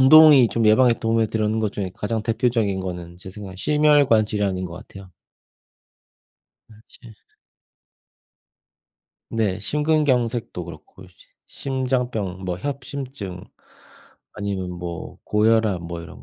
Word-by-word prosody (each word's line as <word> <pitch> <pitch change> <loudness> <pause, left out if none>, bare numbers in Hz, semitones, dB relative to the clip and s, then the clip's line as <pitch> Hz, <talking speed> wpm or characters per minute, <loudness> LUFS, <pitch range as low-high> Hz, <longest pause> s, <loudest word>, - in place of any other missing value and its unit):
운동이 140 -2 +8
좀 115 - 0
예방에 120 +2 +5
도움을 115 0 +1
드렸는 110 0 -1
것 110 -2 -1
중에 95 -3 -4
가장 110 +1 -3
대표적인 115 -3 0
거는 90 -2 -6
제 95 - -10
생각엔 95 -2 -9
심혈관질환인 110 -9 +2
것 85 - -9
같아요. 95 +1 -12 1.6
그렇지. 110 +1 -16 2.2
네. 105 -4 0
심근경색도 130 -2 0
그렇고 95 -1 -12
심 90 - -23 0.2
심장병, 125 -8 -2
뭐 90 -1 -2
협심증, 135 -7 -6 0.9
아니면 100 -3 -3
뭐 85 -1 -7
고혈압 105 -3 +2
뭐 85 0 -6
이런 85 - -12
110 Hz, 250 characters per minute, -22 LUFS, 95-125 Hz, 2.2 s, 운동이